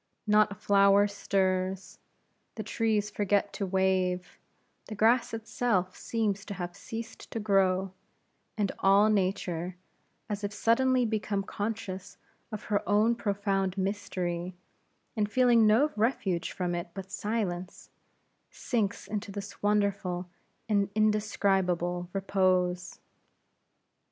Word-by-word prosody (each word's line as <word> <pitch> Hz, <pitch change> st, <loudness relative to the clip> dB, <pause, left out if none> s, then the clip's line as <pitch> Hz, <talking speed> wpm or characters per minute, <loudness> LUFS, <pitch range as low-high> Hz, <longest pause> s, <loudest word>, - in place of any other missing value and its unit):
Not 210 Hz, 0 st, +4 dB
a -, -, -5 dB
flower 200 Hz, +1 st, +4 dB
stirs; 190 Hz, -2 st, -1 dB, 0.6 s
the -, -, -4 dB
trees 215 Hz, -2 st, 0 dB
forget 205 Hz, 0 st, 0 dB
to 200 Hz, -, -3 dB
wave; 185 Hz, -1 st, 0 dB, 0.5 s
the 215 Hz, -, -6 dB
grass 230 Hz, +4 st, +3 dB
itself 220 Hz, -4 st, -1 dB
seems 210 Hz, -4 st, -1 dB
to 200 Hz, -, -6 dB
have 175 Hz, -1 st, -5 dB
ceased 225 Hz, +3 st, -8 dB
to 225 Hz, -, -4 dB
grow; 190 Hz, -2 st, +2 dB, 0.6 s
and 205 Hz, -2 st, +1 dB
all 200 Hz, +2 st, +5 dB
Nature, 185 Hz, -3 st, -1 dB, 0.5 s
as 205 Hz, -1 st, -4 dB
if 205 Hz, -, -2 dB
suddenly 250 Hz, +4 st, +2 dB
become 210 Hz, -2 st, -1 dB
conscious 205 Hz, -2 st, -5 dB, 0.3 s
of 215 Hz, -1 st, -6 dB
her 205 Hz, -2 st, 0 dB
own 215 Hz, +3 st, +4 dB
profound 200 Hz, -3 st, -1 dB
mystery, 185 Hz, -3 st, -2 dB, 0.6 s
and 210 Hz, -2 st, 0 dB
feeling 240 Hz, -2 st, +5 dB
no 255 Hz, +8 st, +4 dB
refuge 210 Hz, -6 st, 0 dB
from 180 Hz, -1 st, -2 dB
it 175 Hz, 0 st, -3 dB
but 195 Hz, -1 st, -7 dB
silence, 190 Hz, -3 st, -3 dB, 0.6 s
sinks 220 Hz, -5 st, -2 dB
into 205 Hz, -1 st, -4 dB
this 200 Hz, 0 st, -8 dB
wonderful 200 Hz, -3 st, 0 dB, 0.4 s
and 200 Hz, -3 st, +2 dB
indescribable 190 Hz, -5 st, +1 dB
repose. 185 Hz, -2 st, 0 dB
200 Hz, 115 wpm, -29 LUFS, 185-215 Hz, 0.6 s, all